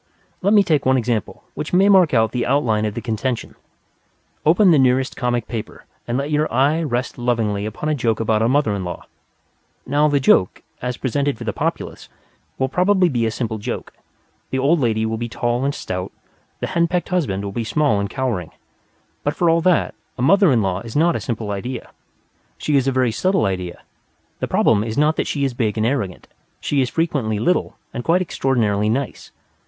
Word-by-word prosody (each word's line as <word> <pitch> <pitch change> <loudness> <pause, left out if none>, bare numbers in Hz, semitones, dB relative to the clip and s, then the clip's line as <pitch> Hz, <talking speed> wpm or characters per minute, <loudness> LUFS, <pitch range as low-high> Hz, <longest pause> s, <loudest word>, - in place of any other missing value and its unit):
Let 200 +3 +2
me 205 - +6
take 155 -6 +1
one 130 0 +3
example 115 -5 -2
which 150 - -6
may 190 +2 +5
mark 190 -5 +5
out 110 -3 +2
the 125 0 -1
outline 120 -6 +1
of 105 - -3
the - - -3
contention. 115 +1 -3 0.9
Open 180 +4 +5
the 155 - +5
nearest 130 0 +2
comic 120 -3 -1
paper 115 -3 -6 0.2
and 120 +1 -1
let 140 +2 -2
your 150 +1 +1
eye 140 +6 +2
rest 130 -5 -2
lovingly 110 -4 0
upon 110 +8 -5
a 155 - +2
joke 115 -6 0
about 110 -1 +1
a 115 - +3
mother 135 -5 +2
in 100 -2 -3
law. 90 -1 -6 0.8
Now, 145 +3 +2
the 145 -1 +2
joke, 95 -8 +3 0.2
as 125 0 -3
presented 140 +1 -1
for - - -7
the - - -2
populace, - - -4 0.5
will 130 - +1
probably 180 +4 +3
be 120 -5 0
a - - +1
simple 110 -1 -3
joke; 120 +4 -5 0.6
the 130 - -2
old 145 +6 +3
lady 110 -4 +1
will 110 0 -2
be 120 0 -3
tall 120 +2 -1
and 140 +1 0
stout, 90 0 -4 0.5
the - - 0
hen 170 -1 +3
pecked 175 +1 -2
husband 130 - -1
will 100 - -4
be 115 +4 -3
small 140 -1 +1
and 100 0 -2
cowering. 120 - -2 0.7
But 145 - -1
for 170 -2 +3
all 165 0 +2
that, 180 -1 +2 0.2
a 125 - -2
mother 195 +3 +5
in 115 -4 +3
law 95 -1 -1
is 115 +1 -9
not 165 +3 +3
a - - -1
simple 110 -4 -3
idea. 110 +6 -5 0.7
She 150 - -1
is 135 -1 +2
a - - +3
very 130 -2 +1
subtle 185 - +1
idea. 90 -2 -3 0.6
The - - -2
problem 105 -2 +3
is 110 0 -4
not 150 +2 +3
that - - 0
she 140 - -1
is 135 -2 0
big 110 -3 -1
and 110 - +1
arrogant; 115 -8 -2 0.3
she 140 -2 0
is 125 - 0
frequently 140 -10 -1
little 175 - 0 0.2
and 120 - -4
quite 175 +5 +2
extraordinarily 110 - 0
nice. 130 +4 -3
125 Hz, 205 wpm, -20 LUFS, 110-150 Hz, 0.9 s, me